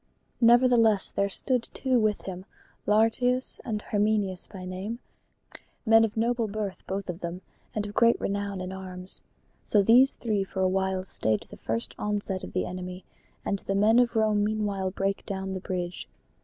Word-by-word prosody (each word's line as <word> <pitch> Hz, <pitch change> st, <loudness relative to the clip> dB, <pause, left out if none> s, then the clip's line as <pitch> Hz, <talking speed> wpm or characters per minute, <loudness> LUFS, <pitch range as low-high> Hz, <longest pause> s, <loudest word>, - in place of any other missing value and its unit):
Nevertheless 235 Hz, -3 st, +5 dB
there 200 Hz, 0 st, 0 dB
stood 250 Hz, +4 st, -1 dB
two 260 Hz, -2 st, +2 dB
with 215 Hz, -2 st, +1 dB
him, 185 Hz, -1 st, -7 dB, 0.4 s
Lartius 235 Hz, +4 st, +2 dB
and 215 Hz, -3 st, -3 dB
Herminius 205 Hz, -3 st, 0 dB
by 185 Hz, -3 st, -9 dB
name, 190 Hz, +5 st, -5 dB, 0.9 s
men 225 Hz, 0 st, +6 dB
of 225 Hz, 0 st, -1 dB
noble 235 Hz, 0 st, +1 dB
birth 205 Hz, -2 st, -4 dB
both 195 Hz, +1 st, -3 dB
of 180 Hz, -1 st, -5 dB
them 175 Hz, +1 st, -5 dB, 0.3 s
and 210 Hz, -1 st, -1 dB
of 205 Hz, -, -7 dB
great 235 Hz, +1 st, +4 dB
renown 200 Hz, -1 st, -2 dB
in 185 Hz, 0 st, -5 dB
arms. 185 Hz, -1 st, -1 dB, 0.4 s
So 205 Hz, -2 st, +3 dB
these 250 Hz, +6 st, +6 dB
three 210 Hz, -4 st, -1 dB
for 190 Hz, 0 st, -4 dB
a 185 Hz, -, +4 dB
while 190 Hz, 0 st, 0 dB
stayed 110 Hz, -, 0 dB
the -, -, -10 dB
first 115 Hz, +2 st, -3 dB
onset 205 Hz, -2 st, -1 dB
of -, -, -8 dB
the 185 Hz, -, 0 dB
enemy; 180 Hz, 0 st, -6 dB, 0.4 s
and 200 Hz, -, -1 dB
the 195 Hz, -, -3 dB
men 215 Hz, +4 st, +5 dB
of 245 Hz, -1 st, +2 dB
Rome 215 Hz, -2 st, +3 dB
meanwhile 205 Hz, -3 st, -1 dB
brake 195 Hz, +1 st, -2 dB
down 190 Hz, -1 st, -3 dB
the 190 Hz, -, -3 dB
bridge. 180 Hz, -1 st, -4 dB
200 Hz, 170 wpm, -27 LUFS, 190-220 Hz, 0.9 s, men